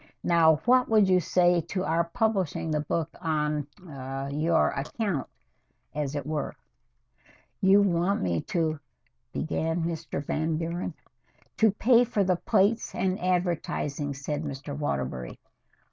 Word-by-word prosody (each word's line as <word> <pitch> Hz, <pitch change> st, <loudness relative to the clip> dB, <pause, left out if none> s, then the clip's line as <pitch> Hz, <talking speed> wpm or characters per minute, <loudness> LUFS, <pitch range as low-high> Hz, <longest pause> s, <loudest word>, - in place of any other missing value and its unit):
Now, 165 Hz, -2 st, +5 dB
what 250 Hz, 0 st, +4 dB
would 215 Hz, -3 st, +5 dB
you 185 Hz, -1 st, +4 dB
say 175 Hz, 0 st, +3 dB
to 185 Hz, -1 st, -2 dB
our 165 Hz, 0 st, +1 dB
publishing 190 Hz, -4 st, -1 dB
the 150 Hz, -, +1 dB
book 160 Hz, +2 st, -2 dB
on 150 Hz, -3 st, -1 dB, 0.2 s
ah 135 Hz, -2 st, -6 dB
on 140 Hz, +2 st, -4 dB
your 165 Hz, +1 st, +3 dB
account, 155 Hz, -, -2 dB, 0.7 s
as 150 Hz, -1 st, -3 dB
it 145 Hz, -2 st, -3 dB
were?" 150 Hz, -1 st, -3 dB, 1.1 s
"You 195 Hz, +1 st, +6 dB
want 185 Hz, +1 st, +1 dB
me 85 Hz, -3 st, 0 dB
to 160 Hz, -3 st, -1 dB, 0.3 s
" -, -, -45 dB
began 165 Hz, +1 st, -1 dB, 0.3 s
Van 155 Hz, +2 st, -1 dB
Buren. 170 Hz, +2 st, -3 dB, 0.6 s
"To 220 Hz, -, +5 dB
pay 235 Hz, +4 st, +4 dB
for 220 Hz, -4 st, 0 dB
the 185 Hz, -2 st, +1 dB
plates 210 Hz, +3 st, +1 dB
and 185 Hz, 0 st, 0 dB
advertising," 170 Hz, -5 st, -1 dB
said 145 Hz, +1 st, -3 dB
Mr. 145 Hz, -1 st, -6 dB
Waterbury. 65 Hz, -, -3 dB
165 Hz, 135 wpm, -27 LUFS, 145-185 Hz, 1.1 s, You